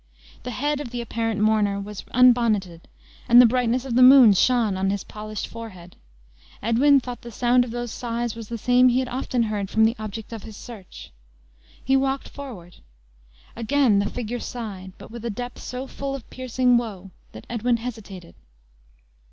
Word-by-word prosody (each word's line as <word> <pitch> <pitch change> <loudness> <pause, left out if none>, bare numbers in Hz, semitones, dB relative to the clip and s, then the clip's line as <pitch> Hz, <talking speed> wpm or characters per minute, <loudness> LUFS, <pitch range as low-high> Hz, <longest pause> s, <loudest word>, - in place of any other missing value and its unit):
The 250 - -7
head 290 +4 -1
of 290 -4 -6
the 245 0 -5
apparent 225 -2 -2
mourner 210 -2 +2
was 205 0 -7
unbonneted, 230 -9 +2 0.4
and 240 +1 +8
the 250 - +9
brightness 250 +1 +1
of 260 - -4
the 250 - +3
moon 255 -4 +9
shone 225 0 +2
on 190 +1 0
his 200 0 -2
polished 215 0 -6
forehead. 185 -7 -10 0.6
Edwin 265 +6 +4
thought 245 -1 -8
the 240 - -9
sound 245 +2 +2
of 245 - -7
those 240 0 -5
sighs 235 -1 -3
was 225 -2 -9
the 235 - -4
same 250 +3 +4
he 245 - +1
had 260 0 0
often 250 -1 -1
heard 210 -3 -3
from 220 +1 +3
the 225 +2 +1
object 215 +1 -7
of 225 - -7
his 215 -1 -11
search. 220 -7 -11 0.7
He 265 - +3
walked 270 0 0
forward. 220 -12 -10 0.8
Again 235 -2 +2
the 200 0 -1
figure 245 0 -5
sighed; 200 -8 -7
but - - -13
with 235 -1 -9
a 235 - -3
depth 245 +3 -6
so 250 +1 -6
full 275 0 -5
of 270 - -10
piercing 255 -1 +1
woe, 200 -5 -5 0.2
that 110 - -11
Edwin 235 +1 0
hesitated. 215 -7 -8
235 Hz, 180 wpm, -23 LUFS, 210-250 Hz, 0.8 s, the